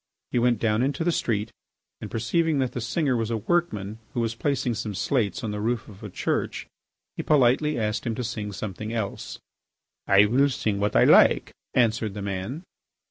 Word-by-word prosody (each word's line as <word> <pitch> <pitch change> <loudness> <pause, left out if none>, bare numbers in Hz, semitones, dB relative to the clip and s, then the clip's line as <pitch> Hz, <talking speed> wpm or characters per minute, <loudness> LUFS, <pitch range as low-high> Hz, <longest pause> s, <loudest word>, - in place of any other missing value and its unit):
He 120 - +1
went 120 -1 +3
down 110 +1 +1
into 140 +6 0
the 175 - +2
street, 110 -8 -1 0.5
and, - - -6
perceiving 155 +8 0
that 130 -2 0
the 125 - -4
singer 130 +4 0
was 115 -2 -1
a 115 - 0
workman 110 - -1 0.2
who - - 0
was 115 -1 0
placing 125 0 -1
some 105 -2 -4
slates 110 -3 0
on 110 - -2
the 105 0 -4
roof 115 0 -1
of 100 -2 -13
a 105 - -7
church, - - -2 0.5
he - - -1
politely 150 +2 +3
asked 110 0 -2
him 115 - -1
to 125 - -3
sing 110 -3 -4
something 105 +2 -5
else. 110 -4 -4 0.7
"I 100 +1 +6
will 135 +7 +3
sing 105 -6 -1
what 105 +1 0
I - - +6
like," - - +5 0.2
answered 110 -4 +1
the 100 - -5
man. 100 - -4
115 Hz, 190 wpm, -25 LUFS, 105-125 Hz, 0.7 s, I